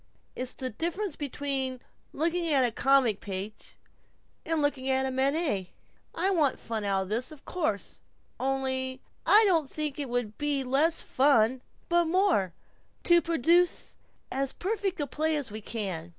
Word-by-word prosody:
It's 255 Hz, 0 st, -3 dB
the 255 Hz, -1 st, -4 dB
difference 340 Hz, -, -3 dB
between 275 Hz, -2 st, -3 dB, 0.3 s
looking 335 Hz, +3 st, 0 dB
at 275 Hz, -3 st, +4 dB
the 240 Hz, -, 0 dB
comic 260 Hz, -4 st, +3 dB
page 200 Hz, +2 st, -6 dB, 0.7 s
and 325 Hz, -1 st, 0 dB
looking 285 Hz, -3 st, 0 dB
at 265 Hz, 0 st, +2 dB
Manet. 270 Hz, -, 0 dB, 0.4 s
I 375 Hz, +4 st, +1 dB
want 310 Hz, -7 st, +2 dB
fun 220 Hz, -2 st, -4 dB
out 195 Hz, -1 st, +1 dB
of 190 Hz, -, -10 dB
this, 240 Hz, +8 st, -2 dB
of 305 Hz, -3 st, -13 dB
course. 305 Hz, -, -2 dB, 0.4 s
Only 260 Hz, -1 st, -2 dB, 0.2 s
I 430 Hz, +2 st, +8 dB
don't 330 Hz, -8 st, +2 dB
think 300 Hz, -2 st, -2 dB
it 280 Hz, -3 st, -3 dB
would 240 Hz, -3 st, -3 dB
be 290 Hz, -2 st, 0 dB
less 290 Hz, +6 st, +2 dB
fun, 255 Hz, -2 st, +3 dB, 0.3 s
but 345 Hz, 0 st, +3 dB
more, 335 Hz, -, +2 dB, 0.5 s
to 345 Hz, 0 st, +5 dB
produce 335 Hz, +2 st, +2 dB, 0.4 s
as 270 Hz, 0 st, -1 dB
perfect 390 Hz, -2 st, -2 dB
a 290 Hz, -, 0 dB
play 310 Hz, +2 st, 0 dB
as 280 Hz, -7 st, -4 dB
we 215 Hz, +1 st, -6 dB
can." 190 Hz, -7 st, -4 dB
275 Hz, 150 wpm, -28 LUFS, 245-325 Hz, 0.7 s, I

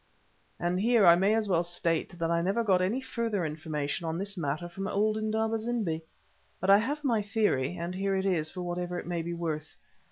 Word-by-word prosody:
And 175 Hz, +1 st, 0 dB
here 225 Hz, 0 st, +4 dB
I 170 Hz, -1 st, +9 dB
may 195 Hz, +5 st, +3 dB
as 220 Hz, -2 st, 0 dB
well 175 Hz, -4 st, +3 dB
state 175 Hz, 0 st, -1 dB
that 165 Hz, 0 st, -1 dB
I 170 Hz, 0 st, +2 dB
never 195 Hz, +7 st, +1 dB
got 190 Hz, -4 st, +3 dB
any 210 Hz, +8 st, 0 dB
further 230 Hz, -8 st, -2 dB
information 155 Hz, +1 st, -3 dB
on 165 Hz, 0 st, -2 dB
this 200 Hz, +2 st, -4 dB
matter 155 Hz, 0 st, -2 dB
from 195 Hz, +3 st, -5 dB
old 215 Hz, +1 st, +1 dB
Indaba 220 Hz, +1 st, 0 dB
zimbi. 215 Hz, -8 st, -1 dB, 0.6 s
But 190 Hz, +2 st, +3 dB
I 200 Hz, -, +8 dB
have 290 Hz, +7 st, -2 dB
my 235 Hz, -6 st, +2 dB
theory, 200 Hz, -, 0 dB
and 170 Hz, +1 st, -4 dB
here 195 Hz, +1 st, 0 dB
it 190 Hz, 0 st, 0 dB
is 165 Hz, -5 st, +1 dB
for 180 Hz, +2 st, -6 dB
whatever 175 Hz, 0 st, -3 dB
it -, -, -5 dB
may 175 Hz, -1 st, -2 dB
be 170 Hz, +1 st, -4 dB
worth. 160 Hz, -2 st, -4 dB
185 Hz, 215 wpm, -29 LUFS, 170-215 Hz, 0.6 s, I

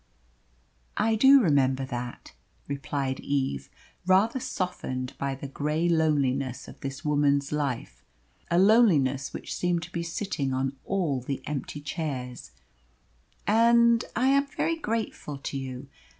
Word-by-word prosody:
"I 225 Hz, -, +2 dB
do 270 Hz, +5 st, +7 dB
remember 135 Hz, -5 st, +2 dB
that," 120 Hz, -1 st, -6 dB, 0.3 s
replied 140 Hz, -1 st, -3 dB
Eve, 130 Hz, -, -2 dB, 0.4 s
rather 200 Hz, +7 st, +4 dB
softened 130 Hz, -, -3 dB
by 140 Hz, -1 st, -1 dB
the 140 Hz, +1 st, -7 dB
grey 150 Hz, +4 st, -1 dB
loneliness 140 Hz, -6 st, +1 dB
of -, -, -12 dB
this 135 Hz, +3 st, -6 dB
woman's 145 Hz, -1 st, +2 dB
life 145 Hz, -5 st, -3 dB, 0.5 s
a 170 Hz, -, +2 dB
loneliness 175 Hz, -, +4 dB
which -, -, -6 dB
seemed 175 Hz, -1 st, 0 dB
to 170 Hz, -, -9 dB
be 170 Hz, -, -3 dB
sitting 165 Hz, -6 st, -2 dB
on 135 Hz, +1 st, -1 dB
all 165 Hz, -10 st, 0 dB
the 135 Hz, +2 st, -4 dB
empty 145 Hz, 0 st, -4 dB
chairs 140 Hz, -5 st, -5 dB, 1.0 s
"and 235 Hz, +1 st, +5 dB
I 255 Hz, +3 st, +3 dB
am 280 Hz, +1 st, +3 dB
very 330 Hz, +4 st, -1 dB
grateful 225 Hz, -, -3 dB
to 140 Hz, -, -6 dB
you. 135 Hz, 0 st, -5 dB
145 Hz, 130 wpm, -27 LUFS, 135-190 Hz, 1.0 s, do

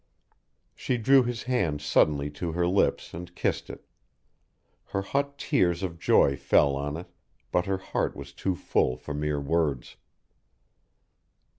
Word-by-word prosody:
She 125 Hz, -, -2 dB
drew 135 Hz, +4 st, +5 dB
his 120 Hz, -2 st, -3 dB
hand 95 Hz, -13 st, 0 dB
suddenly 75 Hz, 0 st, +2 dB
to 80 Hz, +3 st, -4 dB
her 85 Hz, +1 st, +1 dB
lips 95 Hz, +3 st, +1 dB
and 85 Hz, +1 st, -8 dB
kissed -, -, -1 dB
it; -, -, -10 dB, 1.0 s
her 100 Hz, -, -3 dB
hot 140 Hz, +6 st, -2 dB
tears 90 Hz, -, +1 dB
of 85 Hz, -3 st, -4 dB
joy 70 Hz, -, +4 dB
fell 70 Hz, +1 st, +3 dB
on 70 Hz, +2 st, -3 dB
it, 85 Hz, -, -7 dB, 0.5 s
but 90 Hz, +1 st, +1 dB
her 95 Hz, -1 st, 0 dB
heart 95 Hz, -, -2 dB
was 70 Hz, 0 st, -9 dB
too 95 Hz, +5 st, -2 dB
full 65 Hz, -6 st, 0 dB
for 75 Hz, -, -7 dB
mere 75 Hz, 0 st, -1 dB
words. 70 Hz, -3 st, -1 dB
85 Hz, 145 wpm, -27 LUFS, 75-95 Hz, 1.0 s, drew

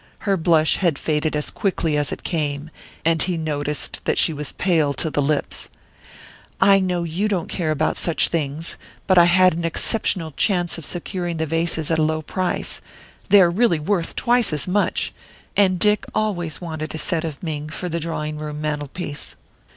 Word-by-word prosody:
Her 200 Hz, -2 st, +1 dB
blush 160 Hz, -3 st, +3 dB
had 170 Hz, -7 st, +1 dB
faded 155 Hz, 0 st, -1 dB
as 150 Hz, -, -1 dB
quickly 180 Hz, -7 st, -1 dB
as 145 Hz, -1 st, +1 dB
it -, -, -6 dB
came, 150 Hz, -2 st, -2 dB, 0.3 s
and 165 Hz, -1 st, +3 dB
he 180 Hz, -2 st, 0 dB
noticed 150 Hz, -2 st, -3 dB
that -, -, +1 dB
she 165 Hz, -, +3 dB
was 150 Hz, -1 st, -4 dB
pale 160 Hz, -6 st, +1 dB
to 155 Hz, -, -2 dB
the 145 Hz, -, +1 dB
lips. 145 Hz, +1 st, -1 dB, 0.9 s
"I 195 Hz, 0 st, +6 dB
know 180 Hz, -2 st, 0 dB
you 170 Hz, +6 st, -1 dB
don't 190 Hz, -6 st, -1 dB
care 170 Hz, -4 st, -2 dB
about 155 Hz, -, 0 dB
such 170 Hz, -, +2 dB
things; 155 Hz, 0 st, -3 dB, 0.3 s
but 185 Hz, -2 st, +5 dB
I 170 Hz, -, +8 dB
had 185 Hz, +1 st, +5 dB
an 170 Hz, +1 st, -3 dB
exceptional 165 Hz, 0 st, 0 dB
chance 175 Hz, +2 st, +1 dB
of 160 Hz, -, -6 dB
securing 175 Hz, -1 st, -3 dB
the 160 Hz, -, 0 dB
vases 165 Hz, 0 st, 0 dB
at 160 Hz, -, +2 dB
a -, -, +3 dB
low 155 Hz, 0 st, 0 dB
price 185 Hz, +3 st, -1 dB, 0.5 s
they 200 Hz, -1 st, +8 dB
are 175 Hz, -2 st, +5 dB
really 210 Hz, -2 st, +3 dB
worth 170 Hz, +2 st, -1 dB
twice 240 Hz, -4 st, +2 dB
as 150 Hz, +2 st, -1 dB
much 200 Hz, +3 st, 0 dB, 0.4 s
and 190 Hz, -2 st, +4 dB
Dick 210 Hz, +3 st, +3 dB
always 175 Hz, -7 st, -1 dB
wanted 160 Hz, -3 st, -5 dB
a -, -, -3 dB
set 165 Hz, 0 st, -1 dB
of 155 Hz, -2 st, -6 dB
Ming 155 Hz, -2 st, -4 dB
for 180 Hz, -, -4 dB
the 170 Hz, -1 st, -2 dB
drawing 155 Hz, -2 st, -4 dB
room 150 Hz, -1 st, -5 dB
mantelpiece." 150 Hz, 0 st, -4 dB
165 Hz, 185 wpm, -22 LUFS, 155-180 Hz, 0.9 s, I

